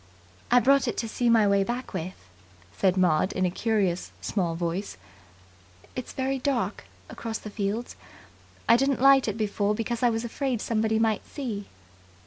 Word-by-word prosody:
"I 245 - +6
brought 275 +2 +4
it 235 - -2
to 230 - -2
see 240 +2 0
my 225 -3 +5
way 200 0 +3
back 240 +5 -4
with," 180 +3 -4 0.6
said 190 -1 +2
Maud 180 -1 +2
in 185 - 0
a 180 - 0
curious, 195 -4 0
small 175 -5 -1
voice. 170 - -3 1.0
"It's 255 - -5
very 265 0 -1
dark 260 -1 -1 0.2
across 225 -1 -5
the 210 - -9
fields. 210 +3 -3 0.7
I 230 - +7
didn't 270 +1 +1
light 275 0 +6
it 215 0 -2
before, 210 -1 0
because 230 +1 -3
I 245 - +4
was 225 0 -2
afraid 255 0 -2
somebody 220 0 0
might 220 -1 0
see." 220 -8 -5
225 Hz, 165 wpm, -26 LUFS, 200-245 Hz, 1.0 s, I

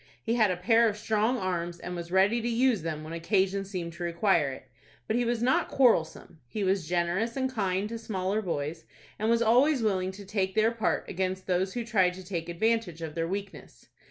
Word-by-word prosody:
He 230 - 0
had 220 -4 +4
a 180 - -1
pair 225 +5 +4
of 210 - -5
strong 220 +3 +1
arms, 175 -4 -2
and 180 0 -6
was 170 0 -6
ready 195 +5 +3
to 235 - -1
use 235 -3 +2
them 155 -1 -4
when 155 +1 -7
occasion 190 +3 0
seemed 180 -4 -5
to 170 +1 -7
require 170 -3 +2
it. 130 0 -10 0.4
But 220 - -1
he 240 0 +1
was 235 0 0
not 255 +2 +2
quarrelsome. 170 - +1
He 210 - -3
was 190 -3 0
generous 180 +7 0
and 260 -1 -1
kind 195 -3 0
to 230 0 -5
smaller 200 -1 -2
boys, 160 -3 -4 0.3
and 215 +2 0
was 235 0 +3
always 250 +4 +4
willing 190 -3 0
to 200 +1 -10
take 190 -1 -1
their 220 +1 +4
part 230 -1 -1
against 185 0 -2
those 185 +1 0
who 240 -1 -2
tried 190 -6 +2
to 185 - -9
take 175 -3 -4
advantage 180 -2 0
of 160 -2 -5
their 165 0 -2
weakness. 195 +2 -7
190 Hz, 215 wpm, -28 LUFS, 175-225 Hz, 0.4 s, had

